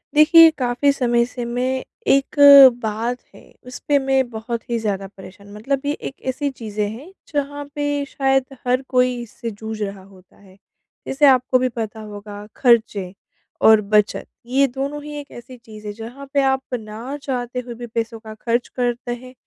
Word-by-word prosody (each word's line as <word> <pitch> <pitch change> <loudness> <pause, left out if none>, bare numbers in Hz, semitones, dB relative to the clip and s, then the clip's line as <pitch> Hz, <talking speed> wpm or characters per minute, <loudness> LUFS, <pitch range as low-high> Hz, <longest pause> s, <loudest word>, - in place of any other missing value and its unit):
देखिए, 325 +2 +8
काफ़ी 255 +2 +1
समय 240 -3 +1
से 245 0 -6
मैं 255 +2 -2 0.2
एक 275 0 +2 0.5
बात 225 +3 -2 0.2
है - - -18
उसपे 270 +3 -1
मैं 265 -2 +1
बहुत 230 +1 -4
ही 235 - 0
ज़्यादा 200 -3 -3
परेशान 195 +1 -13
मतलब 265 +6 -2
ये 290 - +1
एक 275 - -8
ऐसी 285 +2 -2
चीज़ें 215 -5 -4
हैं 260 - -10 0.2
जहाँ 285 0 -3
पे 290 -1 -1
शायद 270 -1 +1 0.2
हर 250 +1 +2
कोई 250 -1 +2
इससे 235 0 -7
जूझ 220 +1 -7
रहा 195 -2 -5
होता 190 -1 -20
है। 190 -2 -19 0.5
जैसे 280 +2 +2
आपको 255 -1 +4
भी 255 0 +1
पता 225 -2 -5
होगा 205 -1 -9
खर्चे 220 -7 +2 0.5
और 220 -1 +6
बचत, 210 0 +1 0.2
ये 270 +3 +2
दोनों 275 +3 -5
ही 300 0 -8
एक 285 - -11
ऐसी 250 +2 -11
चीज़ 215 -2 -12
है 205 - -4
जहाँ 235 +6 -9
पे 280 - +3
आप 265 0 +1 0.2
ना 225 +6 -7
चाहते 250 -2 -3
हुए 245 -1 -7
भी 240 +1 -8
पैसों 230 0 -4
का 220 -1 -10
खर्च 240 +1 0
करते 245 -1 -2
हैं 255 +1 -13
245 Hz, 175 wpm, -20 LUFS, 220-270 Hz, 0.5 s, देखिए